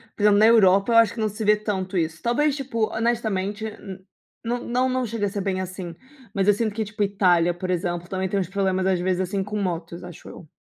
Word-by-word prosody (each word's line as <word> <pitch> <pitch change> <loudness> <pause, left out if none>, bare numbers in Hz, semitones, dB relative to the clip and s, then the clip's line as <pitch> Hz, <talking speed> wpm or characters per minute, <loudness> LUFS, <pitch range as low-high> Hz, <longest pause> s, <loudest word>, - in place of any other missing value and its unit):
por 205 - -4
exemplo, 205 -1 +5
na 215 - +6
Europa, 200 -2 +5
eu - - +6
acho 230 -3 +5
que 230 - -8
não 215 -1 +1
se 215 +2 -6
vê 210 +1 +5
tanto 195 -3 -3
isso, 160 -1 -2
talvez, 280 +5 +1
tipo, 245 -6 -1
honestamente, 220 -3 -1
n 195 -3 -10 0.4
não 240 +1 -1
não 250 +2 +1
não 255 -1 -1
chega 225 -2 -2
a 200 - -1
ser 205 - -4
bem 185 -1 -1
assim, 185 -2 -6 0.4
mas 195 -1 0
eu - - +7
sinto 215 0 -2
que, 220 - -1
tipo, 215 +1 -7
Itália, 180 -4 +2
por 180 +2 -6
exemplo, 175 -1 -2
também 190 0 -2
tem 200 +2 -2
uns 185 -2 -3
problemas 190 -1 0
às 190 -2 +2
vezes 185 0 0
assim 190 +1 -2
com 210 +1 -5
motos, 170 -2 -4
acho 175 -2 -11
eu. 165 - -12
200 Hz, 245 wpm, -23 LUFS, 185-220 Hz, 0.4 s, eu